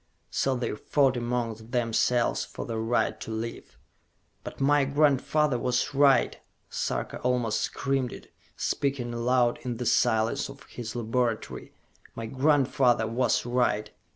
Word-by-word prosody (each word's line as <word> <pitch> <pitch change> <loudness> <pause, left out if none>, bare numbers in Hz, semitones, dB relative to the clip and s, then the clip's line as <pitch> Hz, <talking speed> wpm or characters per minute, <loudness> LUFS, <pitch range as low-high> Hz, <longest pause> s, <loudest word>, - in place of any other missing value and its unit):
So 135 -1 +1
they 125 -3 -2
fought 135 +3 +2
among 120 -1 -1 0.2
themselves 120 0 +1
for - - -7
the 115 -1 -3
right 115 +2 0
to - - -7
live. 115 +1 -6 0.7
"But - - -8
my 145 +1 +4
grandfather 145 -1 +2
was 125 +1 0
right!" 140 -1 +4 0.3
Sarka - - -3
almost 125 -3 0
screamed 135 -3 -1
it, - - -12 0.2
speaking 135 -4 -1
aloud 120 0 +2
in 120 -2 -4
the 125 - -4
silence 115 +2 +2
of 140 0 -11
his 115 -2 -8
laboratory. 120 -1 -2 0.4
"My 115 - -5
grandfather 130 -2 +2
was 120 +2 +1
right! 120 -4 0
125 Hz, 130 wpm, -27 LUFS, 115-135 Hz, 0.7 s, my